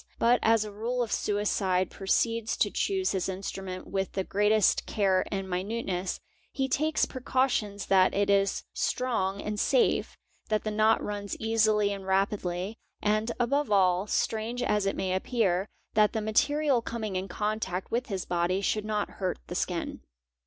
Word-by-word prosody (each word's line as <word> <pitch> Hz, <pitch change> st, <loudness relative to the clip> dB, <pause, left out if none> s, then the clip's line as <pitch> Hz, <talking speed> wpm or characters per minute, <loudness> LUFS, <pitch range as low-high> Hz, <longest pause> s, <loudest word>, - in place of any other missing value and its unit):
But 240 Hz, +2 st, +4 dB
as 225 Hz, -1 st, +3 dB
a 210 Hz, -, -7 dB
rule 235 Hz, +4 st, -2 dB
the 220 Hz, -, -4 dB
suicide 195 Hz, -3 st, 0 dB
proceeds 230 Hz, +3 st, 0 dB
to -, -, +2 dB
choose 385 Hz, -1 st, 0 dB
his 190 Hz, 0 st, -1 dB
instrument 190 Hz, -1 st, -5 dB
with 195 Hz, -1 st, -2 dB
the 190 Hz, -, -1 dB
greatest 210 Hz, +2 st, +2 dB
care 190 Hz, -3 st, +2 dB
and 195 Hz, -1 st, -2 dB
minuteness; 190 Hz, -1 st, -2 dB, 0.3 s
he 270 Hz, -1 st, -1 dB
takes 310 Hz, +4 st, +1 dB
precautions 250 Hz, -6 st, -1 dB
that 190 Hz, -1 st, +4 dB
it 200 Hz, 0 st, +2 dB
is 200 Hz, -1 st, +2 dB
strong 200 Hz, -6 st, -1 dB
and 210 Hz, 0 st, -3 dB
safe, 260 Hz, +1 st, +2 dB, 0.3 s
that 215 Hz, -1 st, +1 dB
the 215 Hz, -, -2 dB
knot 215 Hz, +1 st, +3 dB
runs 205 Hz, -1 st, -4 dB
easily 215 Hz, -2 st, +2 dB
and 195 Hz, -1 st, -8 dB
rapidly, 190 Hz, 0 st, -1 dB, 0.2 s
and 215 Hz, +2 st, +1 dB
above 280 Hz, +5 st, +1 dB
all, 185 Hz, -1 st, +3 dB
strange 225 Hz, +3 st, -1 dB
as 210 Hz, -1 st, +1 dB
it 195 Hz, -, 0 dB
may 190 Hz, -1 st, -1 dB
appear, 190 Hz, -2 st, 0 dB, 0.2 s
that 210 Hz, -1 st, +4 dB
the 220 Hz, -, -1 dB
material 275 Hz, +5 st, +2 dB
coming 220 Hz, -4 st, -4 dB
in 185 Hz, +1 st, -2 dB
contact 200 Hz, -1 st, -3 dB
with 245 Hz, +3 st, -1 dB
his 195 Hz, -5 st, -3 dB
body 175 Hz, +2 st, 0 dB
should 210 Hz, +1 st, -1 dB
not 210 Hz, -1 st, -1 dB
— -, -, -19 dB
hurt 185 Hz, -, -1 dB
the -, -, -7 dB
skin. -, -, -2 dB
210 Hz, 165 wpm, -28 LUFS, 190-225 Hz, 0.3 s, But